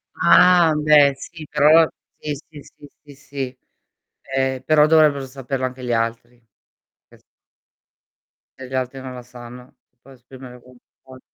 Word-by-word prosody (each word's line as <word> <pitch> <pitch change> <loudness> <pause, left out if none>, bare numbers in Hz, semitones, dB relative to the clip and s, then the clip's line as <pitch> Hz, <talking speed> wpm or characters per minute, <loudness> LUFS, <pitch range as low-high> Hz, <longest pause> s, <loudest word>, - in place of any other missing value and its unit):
Ah, 180 -3 +4
beh, 150 -2 +4
sì, 160 +3 -11
però 155 +2 +4 0.3
sì, 150 - -5 0.2
sì, 150 -2 -13
sì, 145 - -17 0.2
sì, 145 -2 -16
sì. 135 -1 -8 0.7
Eh, 130 -1 -3
però 150 0 +4
dovrebbero 155 -3 +2
saperlo 130 0 -6
anche 125 0 -9
gli 120 - -3
altri, 115 +1 -4 0.7
che - - -21
s - - -31 1.4
E 130 - -8
gli 130 - -13
altri 130 +1 -4
non 130 -1 -9
la 125 - -9
sanno, 125 +1 -14
ti - - -52
puoi 135 0 -17
esprimere 125 0 -14
come 125 +1 -20 0.3
vuoi. 130 -1 -15
135 Hz, 155 wpm, -20 LUFS, 125-150 Hz, 1.4 s, Ah